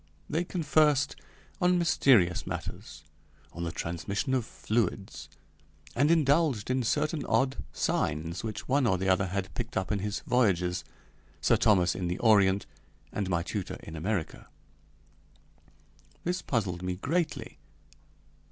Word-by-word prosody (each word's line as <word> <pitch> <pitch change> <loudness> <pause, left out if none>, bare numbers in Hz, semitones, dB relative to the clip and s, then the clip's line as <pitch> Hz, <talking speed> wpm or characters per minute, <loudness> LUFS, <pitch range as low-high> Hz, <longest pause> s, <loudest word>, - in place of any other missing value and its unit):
They 165 +3 0
conversed 150 -4 +2 0.5
on 180 0 +4
mysterious 120 - +3
matters, 75 0 -6 0.5
on 85 0 -4
the 85 - -2
transmission 95 - -3
of 125 -4 +1
fluids, 95 -8 -2 0.7
and 145 +5 +3
indulged 145 -7 +3
in 130 0 +1
certain 150 +5 0
odd 135 0 +2
signs 80 +4 -1
which 110 -2 -5
one 135 -1 +2
or 95 - +2
the 95 +1 -2
other 95 +1 +3
had 95 +1 -3
picked 120 -1 -4
up 95 -1 -1
in 105 - +1
his 105 +1 -3
voyages 90 -7 +1 0.6
Sir 80 +10 +3
Thomas 100 -6 +3
in 90 -2 -3
the 90 +1 -2
Orient, 100 -4 +4 0.5
and 100 -3 -2
my 85 -2 +1
tutor - - -4
in 80 - -8
America. 90 +1 -3 1.8
This 180 +1 -1
puzzled 95 -8 -1
me 90 0 -2
greatly. 155 - -2
105 Hz, 135 wpm, -29 LUFS, 90-135 Hz, 1.8 s, on